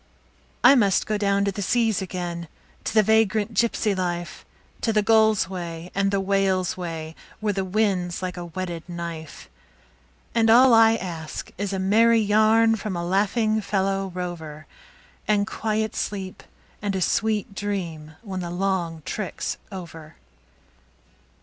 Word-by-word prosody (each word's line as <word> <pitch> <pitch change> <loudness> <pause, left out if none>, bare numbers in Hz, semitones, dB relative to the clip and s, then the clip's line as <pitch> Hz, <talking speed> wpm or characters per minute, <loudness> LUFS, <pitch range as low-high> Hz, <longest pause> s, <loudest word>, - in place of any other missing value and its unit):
I - - +9
must 205 -8 +3
go 215 - -1
down 200 -1 +1
to 200 - +1
the 200 - -5
seas 225 0 +1
again, 175 -2 -5 0.4
to - - -2
the 215 - +6
vagrant 220 0 +2
gypsy 220 -1 +1
life, 175 -2 -3 0.4
To 225 - +1
the 210 -1 +2
gull's 220 -1 +4
way 175 -2 -6
and 195 0 +1
the 200 0 +1
whale's 195 -2 +1
way, 165 -3 -6 0.2
where 210 -1 0
the 195 0 -1
wind's 190 -3 0
like 185 -1 -4
a 175 -1 -6
whetted 175 -1 -6
knife; 170 -2 -7 0.9
And 225 -1 +3
all 245 +2 +7
I 225 0 +6
ask 165 -7 -6
is 200 +1 -3
a 195 - -2
merry 225 +5 +4
yarn 220 +2 +4
from 205 -2 -4
a 170 0 -3
laughing 215 +4 +1
fellow 195 -1 -1
rover, 160 -4 -6 0.6
And 205 -1 +2
quiet 220 0 -2
sleep 190 -2 -4 0.4
and 205 -2 -2
a 190 - -1
sweet 210 0 0
dream 170 -7 -4
when 190 -4 -5
the 175 -1 -4
long 175 -3 -2
trick's 200 -5 -4
over. 165 -5 -9
195 Hz, 150 wpm, -24 LUFS, 175-215 Hz, 0.9 s, I